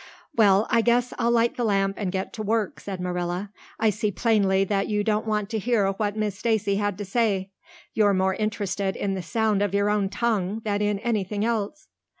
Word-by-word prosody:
"Well, 205 -2 +5
I 230 -2 +4
guess 240 +1 +2
I'll 235 -1 +2
light 235 +3 +2
the 245 - -1
lamp 195 -3 +1
and 195 -4 -1
get 190 0 -3
to 220 - -5
work," 215 -1 -1
said 195 -2 -6
Marilla. 180 +2 -3 0.3
"I 220 -1 +3
see 210 +1 -1
plainly 195 -2 +2
that 195 0 0
you 210 -1 0
don't 215 +1 0
want 210 -2 0
to 220 - -1
hear 210 -3 +1
what 205 +1 -2
Miss 210 -2 -1
Stacy 215 -4 +1
had 205 -2 -1
to 205 - -5
say. 195 -2 0 0.4
You're 205 -2 +3
more 190 0 +2
interested 200 -2 -2
in 195 -1 -2
the 190 - -3
sound 215 +3 0
of 200 -1 0
your 200 +1 +2
own 205 -2 +1
tongue 215 -2 -1
than 205 -1 0
in 205 -1 +1
anything 210 -2 -1
else." 230 +5 -2
205 Hz, 205 wpm, -25 LUFS, 195-220 Hz, 0.4 s, Well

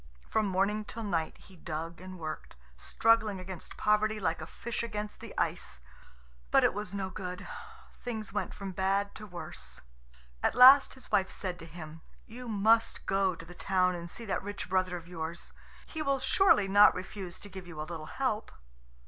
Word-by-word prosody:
From 215 -1 +1
morning 200 +3 +1
till 225 +2 -7
night 165 -6 -1
he 190 - -17
dug 165 +1 -5
and 185 0 -8
worked, 155 -2 -6 0.2
struggling 220 - +2
against 185 -2 -8
poverty 215 +1 +2
like 190 - -1
a 155 - -6
fish 230 +6 -4
against 210 -2 -4
the - - -9
ice; - - -1 0.7
but - - +5
it - - +4
was 205 -1 -5
no 190 -1 -2
good. 180 -1 -6 0.6
Things 220 -5 -4
went 205 - -1
from 195 -1 -6
bad 195 +2 0
to 215 - -9
worse. 175 -3 -8 0.6
At - - +2
last 265 +3 +9
his 260 - -10
wife 190 -1 +3
said 180 -3 -4
to 165 - -9
him: 160 -1 -9 0.2
"You 245 +2 -9
must 225 +1 +3
go 195 -2 +2
to 165 - -10
the 175 - -11
town 185 0 +2
and 170 -1 -6
see 230 - -6
that 200 - -1
rich 205 +1 -5
brother 185 -1 +1
of 170 -1 -11
yours. 165 -1 -5 0.3
He 315 - -6
will 275 -2 +2
surely 265 - +4
not 205 +2 +7
refuse 185 -1 -6
to - - -10
give 190 -2 -9
you 160 -3 -9
a - - -1
little 160 -2 -6
help." 255 -5 -1
195 Hz, 185 wpm, -31 LUFS, 175-215 Hz, 0.7 s, last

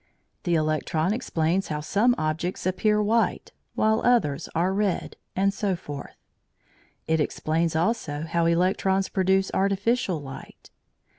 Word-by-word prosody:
The 175 -1 +2
electron 155 +3 0
explains 185 -5 0
how 150 -1 -3
some 225 +10 +2
objects 160 +4 -2
appear 210 +3 +2
white, 225 +2 +1 0.2
while 220 +1 +2
others 225 - +2
are 180 +3 +1
red, 200 -2 -1 0.2
and 195 +1 +2
so 200 -2 -1
forth. 145 -4 -8 0.9
It 160 0 +1
explains 160 +2 0
also 160 -5 -1
how 170 0 +1
electrons 190 +3 +1
produce 190 0 +1
artificial 200 -1 +1
light. 135 -2 -11
185 Hz, 125 wpm, -25 LUFS, 160-200 Hz, 0.9 s, The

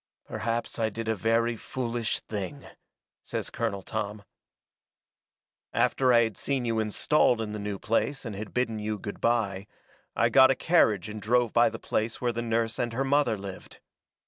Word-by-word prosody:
"Perhaps 115 +2 -3
I 110 -1 +2
did 115 +1 -6
a 110 - +2
very 115 +3 +1
foolish 115 0 -3
thing," 110 +7 -6 0.6
says - - -4
Colonel 105 -5 -2
Tom. 105 0 -4 1.5
"After 130 -1 +3
I 120 -1 +6
had 110 -3 -3
seen 135 -3 -1
you 115 -1 0
installed 115 +3 +2
in 110 -2 -3
the 105 - -4
new 100 -1 -3
place 130 +7 -1
and 110 -3 -5
had 105 +1 -6
bidden 115 -3 -1
you 105 0 -2
good 100 0 -7
bye, 105 -4 0 0.5
I - - +3
got 130 -1 +7
a 135 - +3
carriage 110 - +3
and 105 0 -7
drove 120 +2 +2
by 120 0 +5
the 110 - -7
place 110 0 -2
where 120 -1 0
the 115 - -2
nurse 115 0 -1
and 120 -1 -1
her 130 +4 0
mother 140 -5 +2
lived. 95 -1 -9
115 Hz, 175 wpm, -28 LUFS, 105-120 Hz, 1.5 s, got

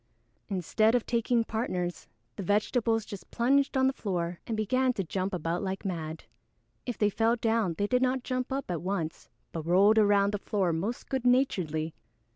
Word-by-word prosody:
_] - - -44 0.5
Instead 215 +4 +2
of 245 - +1
taking 235 0 +1
partners, 185 -6 -3 0.3
the - - -5
vegetables 220 +3 +1
just 200 -5 -9
plunged 275 +3 +2
on 260 - +4
to 265 - +4
the - - -25
floor 175 -4 -2
and 225 - -2
began 255 +5 +2
to 200 -6 -2
jump 185 +3 -2
about 170 -1 -2
like 190 0 -4
mad. 160 -4 -4 0.6
If 245 - -3
they 210 -1 +2
fell 225 +3 +2
down 225 -6 0
they 205 - +1
did 250 +4 +1
not 260 0 +1
jump 255 0 -2
up 270 -7 -2
at 170 - -2
once 175 -3 -3 0.2
but 165 - -4
rolled 200 +5 +5
around 200 -1 +4
the 205 - -1
floor 190 -5 0
most 200 +9 -3
good 265 -2 -2
naturedly. 180 - +1
210 Hz, 190 wpm, -29 LUFS, 180-240 Hz, 0.6 s, rolled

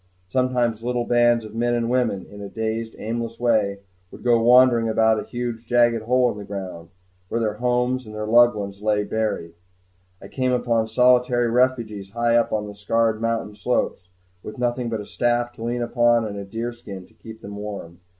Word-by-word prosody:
Sometimes 125 -1 0
little 120 0 -1
bands 120 -1 +3
of 110 - -10
men 120 +1 0
and 115 -1 0
women, 120 -6 0
in 100 0 -12
a 100 - -7
dazed 110 +1 -3
aimless 115 +1 -4
way, 105 -5 +1 0.3
would - - -13
go 120 -2 +3
wandering 120 -1 +5
about 110 0 +3
a - - -4
huge 120 -2 -5
jagged 120 -2 +3
hole 125 0 +3
in 105 - -8
the - - -7
ground, 95 -4 -7 0.4
where 115 - -1
their 105 -2 -1
homes 125 +1 0
and 105 - -9
their 105 0 -3
loved 120 +1 +5
ones 100 -1 -6
lay 105 -1 +1
buried. 105 -6 -2 0.7
I - - -11
came 130 -1 -1
upon 115 -2 +1
solitary 125 0 +3
refugees 115 -6 0
high 120 0 +2
up 120 - +2
on 105 -1 -1
the 105 - -8
scarred 110 +2 0
mountain 115 -2 -1
slopes, 90 -3 -2 0.3
with 105 - -9
nothing 120 0 -1
but 110 -2 -3
a - - -9
staff 120 +1 0
to 115 - -9
lean 120 +1 -1
upon 120 -1 +2
and 105 -1 -5
a 100 -1 -6
deer 115 +4 -4
skin 100 -6 -10
to - - -25
keep 110 0 -12
them 100 +1 -8
warm. 100 -5 -7
115 Hz, 200 wpm, -23 LUFS, 105-120 Hz, 0.7 s, wandering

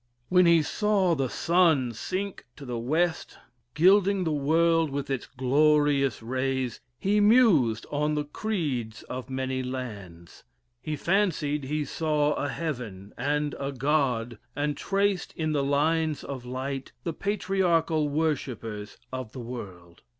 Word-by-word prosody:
When 180 -1 +5
he 170 -2 +5
saw 195 +1 +1
the 135 -5 0
sun 165 -8 +2
sink 190 - -4
to 140 - -10
the 120 -2 -3
west, 160 +8 -1 0.4
gilding 190 +3 +4
the 160 - 0
world 160 +2 +2
with 140 0 -4
its 135 - -2
glorious 140 -1 +2
rays, 130 0 -2 0.2
he 205 +2 +1
mused 205 - +4
on 150 +1 0
the 150 - 0
creeds 145 - -3
of 130 +1 -7
many 130 0 -2
lands. 105 -10 -7 0.4
He 155 - -3
fancied 150 -5 0
he 150 +2 -1
saw 150 -2 +1
a 145 - -2
heaven 120 - -5
and 145 +3 -1
a 140 0 -2
God, 125 -5 0 0.2
and 145 +1 -1
traced 195 +2 0
in 155 -1 -1
the 145 -2 +1
lines 155 +2 +1
of 130 -3 -6
light 135 +1 -4
the 170 - -2
patriarchal 170 -5 +1
worshippers 125 -9 -2 0.2
of 130 -4 -5
the 130 - -7
world. 95 -8 -8
145 Hz, 135 wpm, -27 LUFS, 130-165 Hz, 0.4 s, When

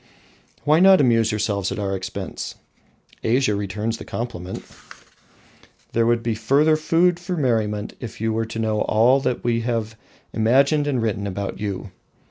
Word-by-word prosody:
Why 155 +2 +4
not 190 +1 +7
amuse 115 -4 +3
yourselves 100 -2 -1
at - - -4
our 100 -2 -2
expense? 95 -1 -6 0.7
Asia 120 0 +2
returns 105 +3 -2
the - - -7
compliment. 95 -6 -5 1.3
There 115 0 +2
would 120 0 +2
be 115 - 0
further 140 +8 +3
food 170 +3 +2
for 180 0 -4
merriment 110 -7 0
if 120 - -8
you 110 0 0
were 115 +1 0
to 110 - -7
know 110 -1 0
all 120 +5 +4
that 125 -3 -2
we 115 -1 +1
have 115 -2 -2 0.4
imagined 140 +6 +3
and 130 -5 0
written 100 -2 -1
about 100 +1 -4
you. 100 -1 -4
115 Hz, 155 wpm, -22 LUFS, 105-130 Hz, 1.3 s, not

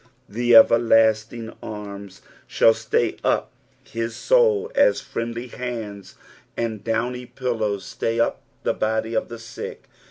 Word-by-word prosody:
The 120 +3 +1
everlostiDg 115 0 +4
anns 100 -2 -8 0.2
shall 115 - +4
stay 110 +1 -1
up - - +1 0.3
his 115 0 -4 0.2
aoul 465 -3 +4
aa - - +5
friendly 115 +1 -5
hands 110 -6 -6 0.4
and 110 -3 -3
downy 120 +3 -2
pillows 110 -7 -2
stay 115 0 -2
up 115 - +1 0.2
the - - +1
body 110 +1 -1
of 110 - 0
the 120 - -7
sick. 115 0 -8
115 Hz, 125 wpm, -23 LUFS, 110-120 Hz, 0.4 s, aa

